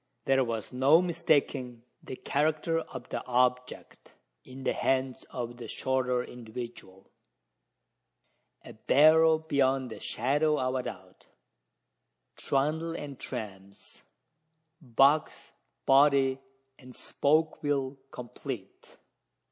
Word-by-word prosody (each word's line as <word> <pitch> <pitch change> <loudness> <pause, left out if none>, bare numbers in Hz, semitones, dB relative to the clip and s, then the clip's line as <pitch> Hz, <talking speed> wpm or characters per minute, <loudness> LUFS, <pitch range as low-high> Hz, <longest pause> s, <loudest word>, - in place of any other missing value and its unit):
There 135 0 +3
was 115 -1 -4
no 135 +6 +5
mistaking 145 -8 0 0.2
the - - -8
character 155 +4 0
of 130 -5 -9
the - - -4
object 125 0 -1 0.3
in 130 +1 -11
the - - 0
hands 130 -1 -1
of 120 -1 -6
the 120 -2 -8
shorter 125 0 -1
individual 115 -5 -10 1.5
a - - -10
barrow 155 +7 +5
beyond 135 -5 0
the - - -8
shadow 150 +6 0
of 130 0 -1
a 130 - -1
doubt 95 -6 -10 1.1
trundle 155 +4 -1
and 140 -4 -7
trams, 100 -2 -9 0.8
box, 140 +3 +2 0.3
body, 135 -1 +4 0.4
and 125 -2 -14
spoke 155 +2 0
wheel 140 -2 -1
complete! 120 -4 -9
130 Hz, 100 wpm, -29 LUFS, 125-145 Hz, 1.5 s, no